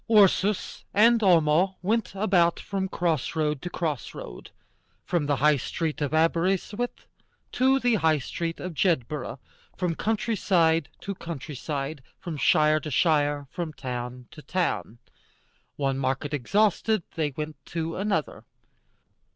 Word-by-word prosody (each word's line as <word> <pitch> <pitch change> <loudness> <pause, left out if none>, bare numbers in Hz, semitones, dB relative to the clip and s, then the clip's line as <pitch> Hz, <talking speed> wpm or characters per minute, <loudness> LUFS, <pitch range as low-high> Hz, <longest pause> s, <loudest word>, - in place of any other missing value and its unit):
Ursus 205 -2 +3
and 230 +3 +6
Homo 175 0 +4
went 215 0 0
about 185 -4 +3
from 190 -1 -3
cross 165 -7 -1
road 150 -3 0
to 175 - -4
cross 150 -11 -3
road, - - -9 0.6
from 170 -5 0
the 145 - +2
High 150 +2 +4
Street 155 +4 -3
of 145 -2 0
Aberystwith 180 +8 0 0.5
to 265 +1 +3
the 245 -2 +2
High 160 -6 +3
Street 165 +4 -4
of 180 -1 -5
Jedburgh, 150 -5 0 0.4
from 180 -2 0
country 220 +5 -1
side 165 -5 +2
to 200 - -4
country 165 -5 -7
side, 140 +1 -4 0.2
from 175 -4 -6
shire 155 +1 +4
to 155 - -6
shire, 145 -1 +2
from 170 -3 -4
town 125 -2 -5
to 150 - -11
town. 170 - -2 0.8
One 135 -2 -1
market 135 +2 -1
exhausted, 205 - +2
they 155 -2 0
went 150 -1 -4
on - - -15
to 165 -1 -2
another. 195 -5 -1
165 Hz, 140 wpm, -26 LUFS, 145-190 Hz, 0.8 s, and